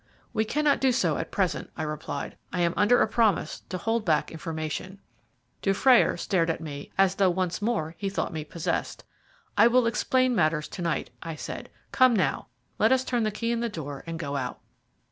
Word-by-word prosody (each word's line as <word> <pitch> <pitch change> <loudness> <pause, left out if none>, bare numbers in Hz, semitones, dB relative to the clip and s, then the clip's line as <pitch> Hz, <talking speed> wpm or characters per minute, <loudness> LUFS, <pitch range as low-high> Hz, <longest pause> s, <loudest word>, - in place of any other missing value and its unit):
"We 220 - +1
cannot 295 +4 +2
do 265 -1 +4
so 175 - +1
at - - -4
present," 190 -3 -1
I - - -2
replied. 150 -2 -4 0.2
"I 180 - -1
am 170 0 +2
under 230 +4 +4
a - - +1
promise 215 -7 +1
to 185 - -3
hold 225 +3 0
back 160 -6 +1
information." 160 +4 -5 0.6
Dufrayer 230 +6 +4
stared 170 -4 +1
at 165 - -1
me 145 -3 -7
as 195 -1 +4
though 195 -1 +3
once 180 +1 -1
more 205 -8 -1
he 200 - -1
thought 195 - -2
me 155 -1 -3
possessed. 165 +2 -3 0.6
"I 225 - +8
will 245 0 +4
explain 255 +2 +2
matters 155 -4 +1
to 185 - -7
night," 170 -2 -1
I 165 -1 -5
said. - - -7 0.2
"Come 255 -2 +5
now, 190 - 0 0.3
let 220 - +4
us 260 0 +4
turn 245 -2 0
the 215 - +1
key 230 +3 -2
in 235 - 0
the 235 0 -1
door 145 -8 -6
and 165 0 -4
go 145 -3 -3
out." 125 -2 -4
185 Hz, 200 wpm, -27 LUFS, 160-230 Hz, 0.6 s, I